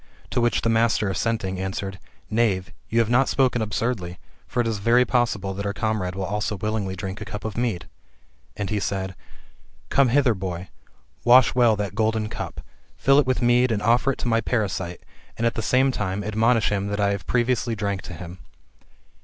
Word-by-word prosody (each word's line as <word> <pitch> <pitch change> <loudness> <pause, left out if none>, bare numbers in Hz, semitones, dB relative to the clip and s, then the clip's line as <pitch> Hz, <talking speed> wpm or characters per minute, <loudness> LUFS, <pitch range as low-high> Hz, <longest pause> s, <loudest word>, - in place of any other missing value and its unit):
To 125 - +1
which 120 0 +1
the - - +1
master 115 -2 +2
assenting, 95 -3 -1
answered, 95 0 -4 0.3
Knave, 105 -5 0 0.2
you 115 +1 +3
haVb - - -7
not 130 +3 +3
spoken 130 -3 +2
absurdly: 105 -4 -2 0.3
for 120 - -3
it 120 - +2
is 110 -2 -1
very 120 +4 +4
possible 115 -6 0
that 100 +1 -4
our 100 - -3
comrade 105 -5 -1
will 95 0 -2
also 105 +3 -2
willingly 100 -1 -2
drink 95 +2 -6
a - - -2
cup 105 - -7
of 110 - -4
mead." 115 -7 -1 0.7
And 100 0 -3
he 105 - 0
said, 95 -1 -2 0.4
" - - -32
Come 140 -2 +4
hither, 130 -1 +3
boy, 90 -2 -5 0.5
wash 125 0 +6
well 120 -3 +4
that 105 -1 -3
golden 110 0 0
cup, - - -6 0.4
fill 135 +1 +4
it 140 - +2
with 130 -1 0
mead, 120 +1 +4
and 105 -2 -1
offer 120 +4 +3
it - - -11
to - - -2
my 115 -1 +2
parasite; 95 -7 -2 0.4
and, 115 - -1
at 115 - +2
the - - -3
same 130 +4 +3
time, 95 -4 -2
admonish 110 +2 +2
him 100 -1 -1
that 100 0 -3
I 100 0 +2
have 100 -4 -4
previously 120 -1 +1
drank 100 -2 -2
to 85 - -9
him." 90 +2 -9
110 Hz, 200 wpm, -24 LUFS, 95-120 Hz, 0.7 s, wash